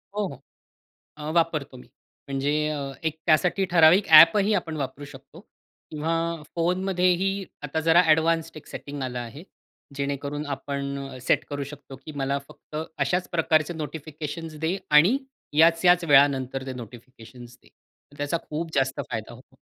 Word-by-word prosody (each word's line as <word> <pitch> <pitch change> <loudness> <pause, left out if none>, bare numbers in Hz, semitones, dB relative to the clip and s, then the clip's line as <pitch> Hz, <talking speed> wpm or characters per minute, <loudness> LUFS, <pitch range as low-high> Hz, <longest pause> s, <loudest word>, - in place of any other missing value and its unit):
हो, 210 0 0
हो, 135 -4 -10 0.8
अ, 150 0 -6
वापरतो 155 -5 0
मी. 125 - -15 0.4
म्हणजे 140 +1 -1 0.5
एक 160 -1 -1
त्यासाठी 175 +4 +3
ठराविक 170 +3 +5
ॲपही 195 +6 +6
आपण 165 -5 -2
वापरू 145 0 -5
शकतो 140 +3 -13 0.5
किंवा 165 +1 -2
फोनमध्येही 185 +2 +1 0.2
आता 150 +2 -2
जरा 170 +2 +7
एडवान्स्ड 165 +1 +2
एक 155 - -11
सेटिंग 145 -1 -7
आलं 125 -1 -4
आहे. 120 +5 -8 0.5
जेणेकरून 140 +1 -3
आपण 140 -1 -5
सेट - - +1
करू 145 -1 -3
शकतो 140 -2 -11
की 155 - -8
मला 140 0 -1
फक्त 150 - -12 0.2
अशाच 175 +6 0
प्रकारचे 160 -1 +2
नोटिफिकेशन्स 155 +1 -6
दे 165 +4 0
आणि 165 - +6 0.4
याच-याच 170 +2 +5
वेळानंतर 135 -3 +3
ते 130 - -4
नोटिफिकेशन्स 120 0 -12
दे. - - -22 0.5
त्याचा 145 +3 -1
खूप 160 +2 -4
जास्त 135 -1 0
फायदा 110 +1 -5
होतो. 130 +2 -19
150 Hz, 135 wpm, -25 LUFS, 140-165 Hz, 0.8 s, जरा